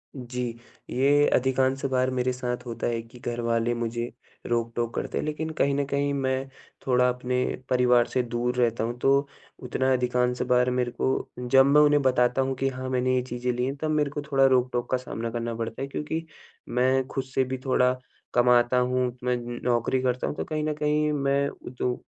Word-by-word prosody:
जी। 125 -1 -5 0.5
ये 145 +3 +3
अधिकांश 130 +1 +1
बार 130 0 +2
मेरे 130 0 0
साथ 125 0 -4
होता 115 -1 -3
है 115 -1 -1
कि 115 +2 -15
घर 120 0 -3
वाले 115 0 +1
मुझे 120 0 -3 0.3
रोक-टोक 115 0 -1
करते - - -3
हैं। - - -1
लेकिन 155 +1 -3
कहीं 140 0 +3
न 140 0 0
कहीं 140 +1 0
मैं 135 -1 -1 0.4
थोड़ा 125 -1 +3
अपने 125 0 -2 0.3
परिवार 125 -1 +4
से 125 - 0
दूर 120 +1 -2
रहता 115 -2 +1
हूँ 120 +2 -3
तो 140 +2 +3 0.4
उतना 130 +1 0
अधिकांश 125 0 0
बार 125 0 +4
मेरे 125 -1 0
को 130 - -1
जब 135 +2 +5
मैं 145 +2 +6
उन्हें 145 -1 +5
बताता 130 -1 +2
हूँ 135 0 -1
कि 135 +1 0
हाँ, 130 0 -5
मैंने 130 0 +1
ये 125 - +2
चीज़ें 125 0 -3
ली 125 +1 -1
हैं 135 +2 -2
तब 155 - -1
मेरे 150 -2 +1
को 145 - -4
थोड़ा 135 -1 +5
रोक-टोक 125 -2 +2
का 130 - +3
सामना 115 -2 -5
करना 115 0 -3
पड़ता 115 +2 -5
है। 135 - -2
क्योंकि 160 +3 -4 0.4
मैं 130 +2 +2
खुद 135 -1 -3
से 130 0 0
भी 130 +1 -3
थोड़ा 125 -1 +3 0.4
कमाता 120 0 +4
हूँ। 125 0 +1 0.2
मैं 125 0 +1
न 120 0 -6
नौकरी 125 +1 +1
करता 125 -1 0
हूँ। - - -3
तो - - -3
कहीं 155 -1 -2
न 155 0 0
कहीं 150 0 +1
मैं 140 0 +1 0.2
जो 125 0 -1
125 Hz, 200 wpm, -26 LUFS, 120-135 Hz, 0.5 s, मैं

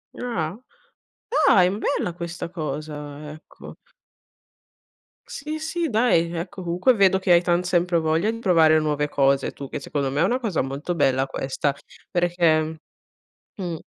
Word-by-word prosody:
Ah. 185 -7 -3 0.9
Dai, 180 -2 +5
bella 180 - -1
questa 170 0 -6
cosa! 150 -2 -6
Ecco. 155 - -13 1.5
Sì, 305 +2 -6
sì, 325 0 -2
dai, 215 -8 +2
ecco, 180 +3 -5
comunque 180 +9 +2
vedo 190 -3 +4
che 185 -1 0
hai 170 - +6
tant 175 0 +1
sempre 175 -1 +1
voglia 160 +7 +1
di 230 - -7
provare 160 -6 +4
nuove 150 -1 -1
cose 140 -1 +2
tu, 140 - -8
che 145 - -5
secondo 140 -1 -2
me 145 +4 -1
è - - +5
una 245 +7 +1
cosa 215 -9 -1
molto 140 +6 -4
bella 135 -3 +2
questa, 135 +1 -2 0.4
perché, 165 -3 +1 0.8
mhmm 175 -6 -5
170 Hz, 140 wpm, -23 LUFS, 150-185 Hz, 1.5 s, hai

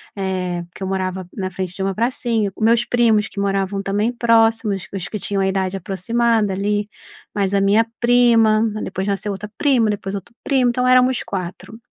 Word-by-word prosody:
eh, 185 -3 -2
que - - -7
eu 190 - -2
morava 185 -1 -3
na 190 -3 -3
frente 185 -1 -5
de 195 - -6
uma 195 0 -1
pracinha. 230 -2 0
Os - - -5
meus 230 +2 +4
primos, 225 -3 +2
que 205 - -8
moravam 195 0 -1
também 205 +4 0
próximos, 225 -4 +2
os 190 -3 -3
que 215 - -5
tinham 200 0 -2
a 190 - +1
idade 190 0 -1
aproximada 210 +3 0
ali, 205 +2 -1 0.5
mais 200 -1 0
a 200 - +3
minha 205 +3 +4
prima, 235 -3 +4 0.2
depois 190 +1 -4
nasceu 200 +1 -1
outra 205 +2 -7
prima, 255 -7 +3
depois 200 -2 -3
outro 235 +4 -8
primo, 260 -3 +2
então, 250 +1 0
éramos 255 0 +4
4. 190 +4 -6
205 Hz, 185 wpm, -20 LUFS, 195-230 Hz, 0.5 s, meus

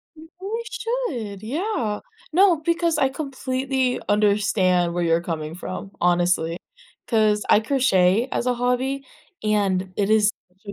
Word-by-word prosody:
You 375 +8 -6
should, 250 - -3
yeah. 275 - -2 0.3
No, 360 0 +5
because 335 0 +1
I 265 - +3
completely 265 -2 -2
understand 200 -4 +2
where 175 0 -1
you're 165 0 +2
coming 160 -2 -4
from, 190 +2 -7
honestly. 175 -1 +1 0.5
'Cause 215 -2 +2
I - - +6
crochet 220 -3 +2
as 240 - -1
a 250 - +3
hobby, 255 +3 -1 0.4
and 195 -3 0
it 200 0 +1
is 215 -1 +4 0.2
such 185 +2 -35
215 Hz, 130 wpm, -23 LUFS, 185-275 Hz, 0.5 s, I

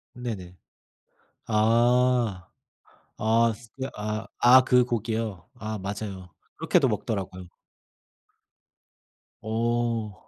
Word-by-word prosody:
네네. 105 -8 -6 0.9
아. 115 -2 +2 0.7
아 115 +1 +3
스 115 0 -16
네. 130 - -3
아. 105 +1 -4
아 125 +2 +8
그 125 -1 +4
고기요? 110 -6 -3
아 110 -2 -5
맞아요. 95 -3 -6 0.2
그렇게도 - - +2
먹더라고요. 95 -4 -4 2.0
어. 115 -1 -1
110 Hz, 150 characters per minute, -26 LUFS, 100-120 Hz, 2.0 s, 아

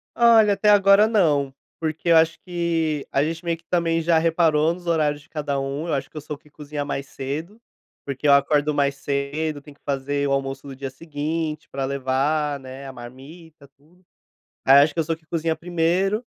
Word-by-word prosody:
Olha, 225 -3 +6
até 210 +1 +2
agora 200 +1 +6
não, 150 -11 +2 0.3
porque 160 +1 -3
eu 165 - +7
acho 160 0 +3
que 165 -4 -1
a 135 - +2
gente 165 +3 -4
meio 170 -1 0
que, 165 - -27
também, 165 -2 +1
já 165 0 +3
reparou 160 -1 +2
nos 175 0 -12
horários 150 -3 +1
de 145 - -23
cada 145 -3 -2
um, 140 +4 -4
eu 165 - -1
acho 135 -1 -2
que - - -12
eu - - -4
soube 150 +1 -9
cozinhar 145 -1 -6
mais 140 -1 -4
cedo, 155 - -6 0.4
porque 140 +1 -3
eu 140 - +7
acordo 145 +1 +3
mais 140 -1 +1
cedo, 145 +2 -3
tenho 145 0 -15
que - - -36
fazer 140 +1 -1
o - - -1
almoço 135 0 -2
do 135 - -8
dia 135 0 -5
seguinte 155 +2 -4
pra 135 0 -2
levar, 140 +2 0
né, 130 +1 -9
a - - -7
marmita 140 +5 -13
tudo. 165 +6 -27 0.6
Aí, 135 - +7
acho 150 - +2
que - - -4
eu - - +3
sou 165 +1 -2
que 160 0 -27
cozinha 165 -1 -1
1º 180 +6 0
150 Hz, 200 wpm, -23 LUFS, 140-165 Hz, 0.6 s, eu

